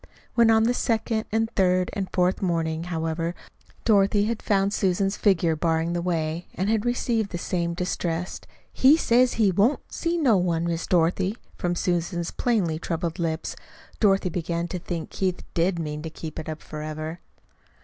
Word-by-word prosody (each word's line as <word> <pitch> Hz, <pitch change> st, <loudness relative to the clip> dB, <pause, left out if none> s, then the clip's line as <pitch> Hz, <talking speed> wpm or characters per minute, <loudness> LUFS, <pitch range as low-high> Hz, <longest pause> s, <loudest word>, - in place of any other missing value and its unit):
When 235 Hz, -1 st, +5 dB
on 220 Hz, 0 st, +5 dB
a 245 Hz, -, +2 dB
second 225 Hz, -2 st, 0 dB
and 225 Hz, +1 st, +1 dB
a -, -, -22 dB
third 185 Hz, -1 st, +2 dB
and 195 Hz, -2 st, -2 dB
a -, -, -22 dB
fourth 180 Hz, +1 st, +1 dB
morning, 165 Hz, -3 st, -1 dB
however, 165 Hz, 0 st, -2 dB, 0.5 s
Dorothy 205 Hz, -1 st, +4 dB
had 225 Hz, 0 st, -2 dB
found 200 Hz, -1 st, +1 dB
Susan's 195 Hz, 0 st, +1 dB
figure 170 Hz, -5 st, +2 dB
barring 165 Hz, +1 st, 0 dB
the 175 Hz, -, -1 dB
way, 165 Hz, -1 st, -2 dB
and 195 Hz, +4 st, 0 dB
had 225 Hz, +1 st, +1 dB
received 235 Hz, -3 st, 0 dB
the 175 Hz, -, -4 dB
same 170 Hz, -1 st, -2 dB
distressed 175 Hz, -1 st, -3 dB, 0.3 s
"He 275 Hz, +4 st, +6 dB
says 250 Hz, -4 st, +3 dB
he 215 Hz, -4 st, +3 dB
won't 205 Hz, +10 st, +1 dB
see 340 Hz, 0 st, -1 dB
no 255 Hz, -, +4 dB
one, 170 Hz, -2 st, +1 dB
Miss 170 Hz, -1 st, -2 dB
Dorothy," 185 Hz, +4 st, +2 dB, 0.2 s
from 175 Hz, 0 st, -1 dB
Susan's 175 Hz, -1 st, -1 dB
plainly 190 Hz, -10 st, 0 dB
troubled 165 Hz, 0 st, -3 dB
lips, 160 Hz, -1 st, -2 dB, 0.4 s
Dorothy 195 Hz, -3 st, +3 dB
began 170 Hz, 0 st, -2 dB
to 180 Hz, -, -3 dB
think 165 Hz, -2 st, -5 dB
Keith 185 Hz, -2 st, -2 dB
did 175 Hz, +2 st, +1 dB
mean 150 Hz, -2 st, -4 dB
to 160 Hz, -, -5 dB
keep 160 Hz, 0 st, -7 dB
it 160 Hz, -, -6 dB
up 155 Hz, 0 st, -6 dB
forever. 155 Hz, +2 st, -5 dB
180 Hz, 175 wpm, -25 LUFS, 165-205 Hz, 0.5 s, He